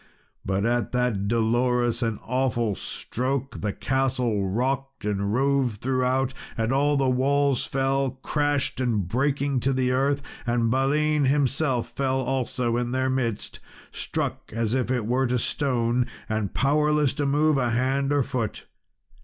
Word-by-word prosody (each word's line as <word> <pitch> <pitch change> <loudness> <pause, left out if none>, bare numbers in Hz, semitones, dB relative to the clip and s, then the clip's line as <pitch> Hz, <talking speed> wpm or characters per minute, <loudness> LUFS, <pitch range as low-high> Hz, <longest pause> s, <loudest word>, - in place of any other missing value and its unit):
But 95 +2 0
at 120 +1 0
that 125 -5 0
Dolorous 120 +2 +1
and 115 -3 0
awful 120 -3 0
Stroke 130 +7 -3
the 105 - -1
castle 125 -6 0
rocked 135 +4 -2
and 100 -1 -1
rove 135 -1 +1
throughout, 130 +2 0 0.2
and 115 +2 0
all 145 +2 +2
the 135 -1 +2
walls 140 +1 +2
fell 135 0 +1
crashed 145 -3 0
and 110 -8 0
breaking 140 +4 0
to 135 +2 +1
the 130 -1 +1
earth, 140 +2 +1 0.2
and 120 -1 +1
Balin 145 +3 +2
himself 135 -2 +1
fell 135 -1 -1
also 125 -2 -1
in 120 0 -2
their 130 0 +1
midst, 120 -5 -2 0.3
struck - - -3
as 115 0 -1
it 125 -3 0
were 125 +3 +1
to 125 +1 +1
stone, 120 -2 0 0.2
and 110 -3 -2
powerless 150 +1 +2
to 145 -2 -1
move 150 +1 +3
a 125 -2 +1
hand 135 +3 +1
or 145 -1 +3
foot. 125 -5 -3
130 Hz, 145 wpm, -25 LUFS, 120-135 Hz, 0.3 s, move